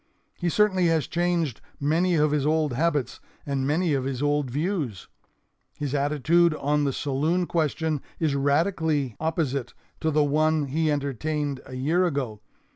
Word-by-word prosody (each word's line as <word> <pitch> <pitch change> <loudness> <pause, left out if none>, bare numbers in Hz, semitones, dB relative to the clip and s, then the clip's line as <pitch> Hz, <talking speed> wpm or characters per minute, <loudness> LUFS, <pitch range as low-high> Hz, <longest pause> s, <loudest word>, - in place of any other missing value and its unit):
He 175 - -2
certainly 190 -2 +3
has 165 -2 +2
changed 170 -7 -1 0.2
many 165 +5 +2
of 150 -1 +3
his 150 -2 +1
old 155 -2 +1
habits 145 -3 0 0.3
and 135 -2 -1
many 160 +2 +1
of 135 -2 0
his 135 0 -3
old 145 -2 +1
views. 145 - -2 0.7
His 145 -2 -3
attitude 150 +4 +2
on 150 0 +1
the 140 - +1
saloon 150 +7 0
question 160 -2 -1 0.2
is 155 -4 +1
radically 145 - +1
opposite 155 -5 -2 0.2
to 160 - 0
the 150 -1 +3
one 155 +1 +2
he 155 +3 +1
entertained 145 0 -2
a 130 - -8
year 155 +8 +1
ago. 130 -9 -3
150 Hz, 150 wpm, -25 LUFS, 140-165 Hz, 0.7 s, certainly